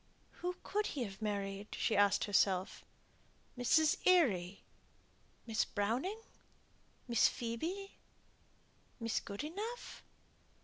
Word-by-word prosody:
"Who 360 0 -2
could 420 +1 0
he 270 - -2
have 200 -2 -7
married?" 200 -1 -2
she - - 0
asked 205 0 +4
herself. 190 -2 +1 0.7
"Miss 295 +5 +4
Eyre? 205 - +4 0.9
Miss 225 -2 +1
Browning? 235 - -1 0.9
Miss 235 -2 +5
Phoebe? 330 +13 -4 1.0
Miss 230 -1 0
Goodenough?" 390 - -6
230 Hz, 90 wpm, -35 LUFS, -, 1.0 s, Miss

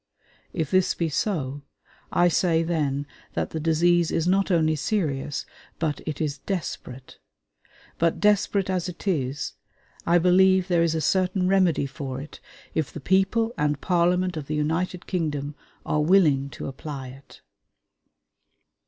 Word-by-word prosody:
If 160 -4 -3
this 185 -1 +3
be 165 -2 -1
so, 145 -5 -2 0.5
I 175 - +4
say 165 -1 +2
then 145 -4 -1 0.3
that - - -2
the 160 - -3
disease 170 +2 +3
is 165 - 0
not 195 +2 +2
only 160 -3 +3
serious, 150 -5 -2 0.3
but 155 -3 -2
it 150 -2 -3
is 145 -3 -2
desperate; 135 -8 -6 0.8
but 165 0 +1
desperate 205 -1 +2
as 185 -1 -1
it 180 +3 -10
is, 140 -6 -1 0.5
I 170 +1 +5
believe 185 +1 +4
there 175 -2 +3
is 165 -1 +2
a 160 - -1
certain 185 +1 +1
remedy 185 -6 +3
for 135 -1 -5
it 145 +3 -10 0.3
if 155 -3 -1
the - - -7
people 195 - +1
and 150 -1 +1
Parliament 180 +1 +1
of 145 -3 -5
the 155 - -2
United 165 +4 -1
Kingdom 150 -5 -2 0.3
are 150 - +1
willing 150 -5 +4
to - - -8
apply 135 -1 -6
it.... 135 +2 -15
165 Hz, 145 wpm, -25 LUFS, 145-180 Hz, 0.8 s, I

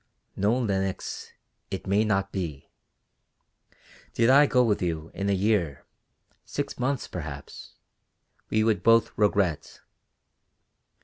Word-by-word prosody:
"No, 105 +5 +2
Lenox, 95 -6 -2 0.4
it 95 - -5
may 100 +2 +2
not 100 -2 0
be. 80 -8 -5 1.4
Did 115 +2 +4
I 145 +2 +7
go 125 -2 +3
with 110 -4 +1
you, 80 -2 -3
in 100 0 -2
a - - +3
year 95 -8 0 0.6
six - - -5
months, 130 +2 -1
perhaps 75 -5 -8 0.7
we 110 0 +2
would 110 -4 +1
both 115 +2 +4
regret. 100 -6 0
100 Hz, 115 wpm, -26 LUFS, 90-110 Hz, 1.4 s, I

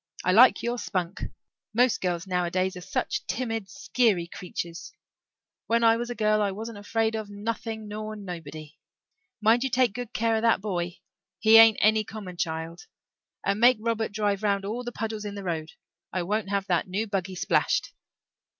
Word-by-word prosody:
I 185 - +4
like 240 +7 +6
your 240 +1 -1
spunk. 185 -2 -3 0.5
Most 245 0 +3
girls 175 -1 -1
nowadays 185 0 0
are 180 - -7
such - - -2
timid, 225 -5 -3
skeery 205 0 +1
creeturs. 170 -1 -7 0.7
When 230 +1 +2
I 225 0 +6
was 240 +1 -3
a 245 - -4
girl 215 -1 +2
I 205 - +2
wasn't 215 +2 -6
afraid 225 +2 0
of 220 -2 -4
nothing 220 +1 -4
nor 215 +1 -5
nobody. 160 -6 -8 0.6
Mind 225 +3 +4
you 265 - 0
take 250 -4 +2
good 245 0 -6
care 225 -1 +1
of - - -1
that 230 -2 +3
boy. 180 -3 -3 0.4
He 220 0 +7
ain't 225 -1 +8
any 215 +1 +4
common 195 -4 -8
child. 165 +1 -4 0.6
And 200 - +1
make 245 +1 +6
Robert 225 -1 -1
drive 205 -1 0
round 200 -2 0
all 230 +5 -3
the 240 - -5
puddles 220 -2 -4
in 205 -1 -5
the 200 - -6
road. 165 -3 -3 0.4
I 185 - -1
won't 210 +2 -1
have 200 -1 0
that 180 -2 0
new 200 +4 -1
buggy 190 -3 -3
splashed." - - +1
210 Hz, 175 wpm, -27 LUFS, 185-225 Hz, 0.7 s, ain't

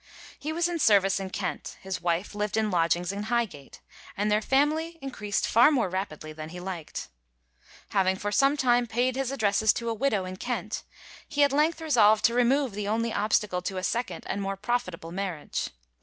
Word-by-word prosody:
He 305 - -3
was 340 +2 +1
in 345 -1 -3
service 200 -6 +4
in 190 -1 -4
Kent, 185 -1 -4
his 190 -3 -5
wife 175 +3 -1
lived 210 +1 -2
in 215 -1 +1
lodgings 175 +1 +1
in 200 +1 -4
Highgate, 225 - -2 0.4
and 210 +1 +1
their 210 +1 +3
family 305 +7 +1
increased 210 -8 -2
far 235 +5 +6
more 245 -10 +1
rapidly 155 -5 -4
than 155 0 -7
he 180 +2 -8
liked. 175 - -6 0.8
Having 190 -1 +2
for 205 +2 -3
some 275 +6 +3
time 245 -2 +3
paid 245 +3 0
his 270 -1 -1
addresses 215 -4 +3
to 235 0 -3
a - - 0
widow 220 -5 0
in 185 0 -6
Kent, 220 -2 -3 0.4
he 290 -1 +2
at 285 - +4
length 310 +3 +2
resolved 220 -9 +4
to 235 - +4
remove 250 +2 +2
the 205 0 -3
only 225 +2 0
obstacle 210 -3 +1
to 190 +1 -4
a 185 - -3
second 235 +5 -2
and 200 - -3
more 195 0 -3
profitable 190 -7 -3
marriage. 180 -5 -3
210 Hz, 190 wpm, -27 LUFS, 190-245 Hz, 0.8 s, far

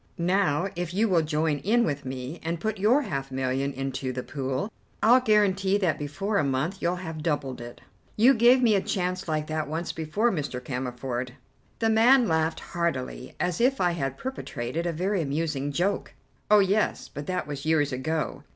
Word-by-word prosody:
Now, 180 -2 +1
if 175 0 -4
you 220 +3 +3
will 180 -5 +3
join 155 -1 0
in 235 +8 +2
with 145 -5 -2
me, 130 +4 -5
and 165 +1 -3
put 215 +2 -2
your 240 +9 +4
half 135 - -4
million 130 +1 -1
into 135 -1 -3
the 125 0 -4
pool, 135 - -3 0.3
I'll 240 +4 +7
guarantee 200 -4 +3
that 170 -6 0
before 195 +9 -1
a - - +2
month 140 +8 -1
you 175 +1 +1
have 165 -4 -6
doubled 140 -5 -2
it." 120 0 -10 0.4
"You 245 +5 +7
gave 245 +2 +5
me 225 -3 +5
a 195 - +3
chance 185 -1 -2
like 155 -1 -1
that 155 -1 -2
once 160 +3 -3
before, 185 +10 0
Mr. 150 - -3
Cammerford." 125 -1 -4 0.4
The 225 -1 +2
man 240 +3 +5
laughed 160 -1 0
heartily 170 -7 -3
as 180 +3 -1
if 265 +2 +3
I 180 -1 +3
had 135 -5 -3
perpetrated 165 - -4
a - - 0
very 185 +4 0
amusing 145 -1 -2
joke. 185 +7 -1 0.3
"Oh, 210 - +7
yes, 200 +2 +1
but 145 0 -8
that 185 0 -1
was 145 0 -6
years 150 -3 +2
ago. 145 +1 -2
160 Hz, 185 wpm, -26 LUFS, 140-195 Hz, 0.4 s, I'll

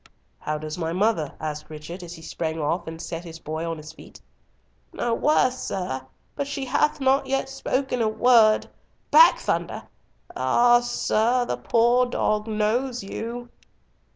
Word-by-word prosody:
"How 155 0 -3
does 155 +2 -6
my 165 -1 -2
mother?" 185 -6 0
asked 150 0 -5
Richard, 155 +4 -8
as 175 0 -8
he 160 - -13
sprang 160 0 -4
off 165 +3 -1
and 160 0 -7
set 165 0 -6
his 165 -2 -9
boy 160 +1 -4
on 165 - -3
his 155 +1 -10
feet. - - -14 0.7
"No 235 - -1
worse, 255 -1 +2
sir, 130 -9 -4 0.3
but 280 - -3
she 280 -1 -4
hath 300 +4 +1
not 270 0 +2
yet 270 0 0
spoken 265 -2 -2
a 220 - +2
word—back, 235 - +4
Thunder—ah! 240 - 0
sir, 240 0 +1
the - - -2
poor 240 +2 +3
dog 215 -3 0
knows 225 +3 -1
you." 235 +4 -6
215 Hz, 150 wpm, -24 LUFS, 160-245 Hz, 0.7 s, word—back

